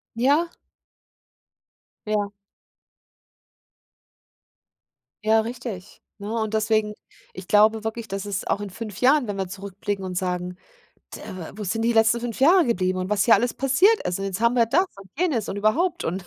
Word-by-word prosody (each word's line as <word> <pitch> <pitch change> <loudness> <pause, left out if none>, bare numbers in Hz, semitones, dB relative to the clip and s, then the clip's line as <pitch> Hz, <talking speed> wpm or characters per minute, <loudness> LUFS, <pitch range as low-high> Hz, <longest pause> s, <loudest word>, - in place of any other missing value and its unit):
Ja. 285 +8 +2 1.6
Ja. 210 -1 0 2.9
Ja, 220 +1 +4
richtig, 225 -4 -7 0.2
ne, 205 +1 -6
und 220 -1 -2
deswegen, 215 -1 +1 0.4
ich 185 0 -10
glaube 215 +1 +4
wirklich, 220 +1 -4
dass 195 -1 -5
es 200 -1 -4
auch - - 0
in 205 -1 -5
5 210 0 -8
Jahren, 265 +1 +4
wenn 205 -2 -4
wir 190 -1 -3
zurückblicken 200 +1 -5
und 185 -1 -5
sagen, 180 0 -2 0.6
d - - -8
äh, - - -10
we 170 -3 -8
wo 210 - -5
sind 225 +4 -2
die 235 +1 +1
letzten 225 +1 +4
5 235 -2 -5
Jahre 335 +5 +5
geblieben 185 -5 0
und 185 0 -3
was 205 -1 +2
hier 230 - +7
alles 245 0 +1
passiert 350 - +3
ist? 180 - -2
Und 195 - -3
jetzt 190 0 -4
haben 235 +1 +3
wir 235 -1 +4
das 320 +11 +3 0.2
und 195 - -15
jenes 305 - 0
und - - -4
überhaupt 325 - +1
und 180 +2 -3
215 Hz, 175 wpm, -24 LUFS, 195-235 Hz, 2.9 s, hier